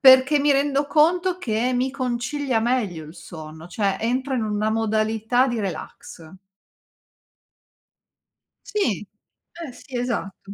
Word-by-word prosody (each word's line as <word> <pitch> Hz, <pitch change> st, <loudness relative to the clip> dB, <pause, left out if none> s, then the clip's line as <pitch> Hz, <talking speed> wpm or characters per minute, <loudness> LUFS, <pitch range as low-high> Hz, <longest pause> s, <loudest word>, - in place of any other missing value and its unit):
perché 260 Hz, +2 st, +7 dB
mi 285 Hz, 0 st, +4 dB
rendo 280 Hz, +1 st, +2 dB
conto 350 Hz, +5 st, +3 dB
che 240 Hz, -4 st, 0 dB
mi 255 Hz, +2 st, +1 dB
concilia 255 Hz, 0 st, -1 dB
meglio 220 Hz, -9 st, 0 dB
il 155 Hz, +3 st, -12 dB
sonno, 160 Hz, -2 st, -10 dB
cioè 195 Hz, +1 st, 0 dB
entro 255 Hz, +4 st, -1 dB
in 235 Hz, -, 0 dB
una 215 Hz, 0 st, 0 dB
modalità 220 Hz, +3 st, +1 dB
di 240 Hz, -2 st, -1 dB
relax. 170 Hz, -2 st, -6 dB, 2.4 s
Sì. 235 Hz, -, -1 dB, 0.5 s
Eh 330 Hz, -6 st, -7 dB
sì, 250 Hz, +1 st, -8 dB
esatto. 200 Hz, -5 st, -3 dB
240 Hz, 120 wpm, -23 LUFS, 210-275 Hz, 2.4 s, perché